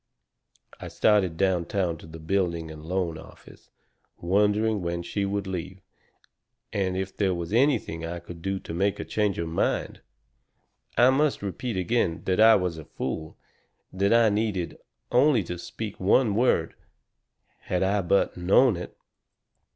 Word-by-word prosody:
I - - -7
started 95 -6 +2
downtown 95 -1 0
to - - -12
the 80 +1 -10
building 85 -1 -1
and 75 -1 -10
loan 85 -1 -2
office, - - -16 0.5
wondering 105 +3 +1
when 85 0 -3
she 100 +3 -2
would 100 0 -2
leave, 95 0 -5 0.9
and 95 -2 -1
if 95 0 -4
there 95 -3 +1
was 85 +2 -5
anything 120 - +1
I 85 +1 -4
could 85 0 -10
do 95 +2 -2
to - - -8
make 100 +4 0
her - - -4
change 105 -3 0
her 85 - -2
mind. 80 +1 -1 1.0
I 125 +2 +6
must 140 -3 +1
repeat 100 +3 -4
again 90 -3 0
that 95 +1 0
I 110 +1 +8
was 90 -4 -1
a 80 - -10
fool 80 +4 -5 0.6
that 100 +2 +1
I 115 -1 +5
needed 105 -4 -2 0.3
only 125 -3 +4
to 90 0 -6
speak 105 +3 -7
one 105 +4 +3
word, 110 -7 +2 0.9
had 90 0 -1
I 100 +2 +1
but 95 +2 +1
known 95 +5 +4
it. 90 - -8
95 Hz, 150 wpm, -26 LUFS, 85-105 Hz, 1.0 s, I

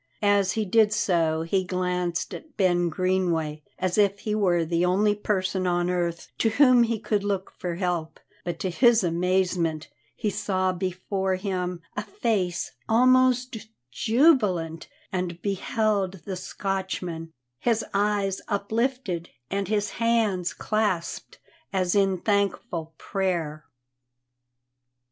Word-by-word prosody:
As 200 -2 +3
he 220 -1 -1
did 210 +2 +4
so 165 -6 +1
he 185 +3 0
glanced 180 -1 -2
at 315 - -10
Ben 175 -3 +2
Greenway 170 -3 0 0.2
as 185 +2 0
if 200 0 +3
he 210 - -2
were 180 -5 +2
the 170 +1 0
only 200 +4 +3
person 190 -2 -1
on 175 0 +1
earth 170 -1 -2
to 225 - +3
whom 255 +1 +5
he 230 -1 +2
could 210 -2 -1
look 200 -2 -2
for 175 -2 -3
help, 175 -3 -2 0.2
but 175 -1 -3
to 185 - -1
his 235 +2 +4
amazement 175 -2 0 0.3
he 210 - -1
saw 185 -2 0
before 185 +1 -2
him 180 -2 -3
a 210 - -1
face 200 -5 -1 0.2
almost 255 -1 +3 0.2
jubilant, 210 - +2 0.2
and 180 -2 -3
beheld 200 -1 0
the 195 - -3
Scotchman, 185 -3 -4 0.3
his 225 -2 +1
eyes 200 -1 +1
uplifted 205 -3 -1 0.2
and 195 -1 -1
his 205 -1 0
hands 220 -6 +2
clasped 210 -6 -2 0.3
as 185 -2 +1
if 200 - +5
in 195 -1 +1
thankful 180 -5 -1
prayer. 170 -6 -2
190 Hz, 125 wpm, -26 LUFS, 175-210 Hz, 0.3 s, whom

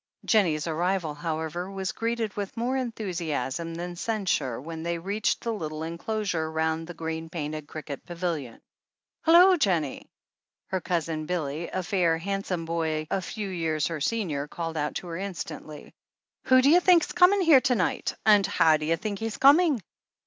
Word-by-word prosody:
Jennie's 170 -9 +2
arrival, 170 0 -1
however, 160 +3 -4
was 190 -1 -3
greeted 230 -2 -2
with 200 +1 -5
more 245 +3 0
enthusiasm 170 - -3
than 175 +1 -5
censure, 180 - -1
when 160 +4 -7
they 170 +1 -2
reached 200 +5 -1
the 230 - -2
little 155 -6 -4
enclosure 170 0 -2
roimd 160 0 -1
the 175 - -8
green 160 0 -4
painted 155 -3 -5
cricket 150 -2 -7
pavilion. 170 -8 -4 0.7
"Hullo, 355 +3 +7
Jennie!" 170 - 0 0.6
Her 190 -1 -1
Cousin 165 -3 -2
Billy, 160 -2 -3
a 185 - -3
fair, 175 -4 +2
handsome 190 -1 -3
boy 160 -2 -1
a 195 - +1
few 205 +1 -5
years 160 -4 -1
her 165 -3 -3
senior, 150 -7 -1
called 165 +1 -5
out 150 -1 -2
to 180 - -5
her 165 -1 -5
instantly: 165 -5 -7 0.5
"Who 255 0 +5
do 280 - +6
you 350 - +7
think's 355 -2 +4
coming 365 +3 +5
here 320 -7 +6
to 250 - +2
night? - - -1
— - - -43
and 205 -3 +6
how 165 -5 +4
do 150 - -5
you 165 +1 +2
think 205 0 -4
he's 225 0 -3
coming?" 285 - +5
175 Hz, 170 wpm, -27 LUFS, 160-210 Hz, 0.7 s, Hullo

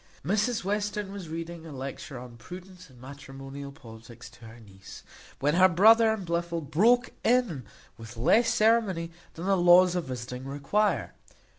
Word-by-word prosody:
Mrs 215 - 0
Western 205 0 -2
was 195 -5 -8
reading 165 +1 -7
a 165 - -10
lecture 135 0 -7
on 120 -1 -10
prudence, 180 +8 -12
and 125 -2 -19
matrimonial 135 +1 -10
politics, 115 -2 -13
to 120 - -16
her 110 +2 -13
niece, 95 -3 -14 0.4
when 145 +2 +1
her 185 +2 +5
brother 220 +5 +5
and 215 -4 -4
Blifil 170 0 -2
broke 230 - +2
in 230 - +1 0.4
with 115 +1 -11
less 225 - +3
ceremony 215 -7 +1 0.2
than 165 - -7
the 195 0 +2
laws 175 0 +5
of 180 -2 -2
visiting 125 0 -7
require. 145 +10 -1
170 Hz, 155 wpm, -27 LUFS, 135-200 Hz, 0.4 s, her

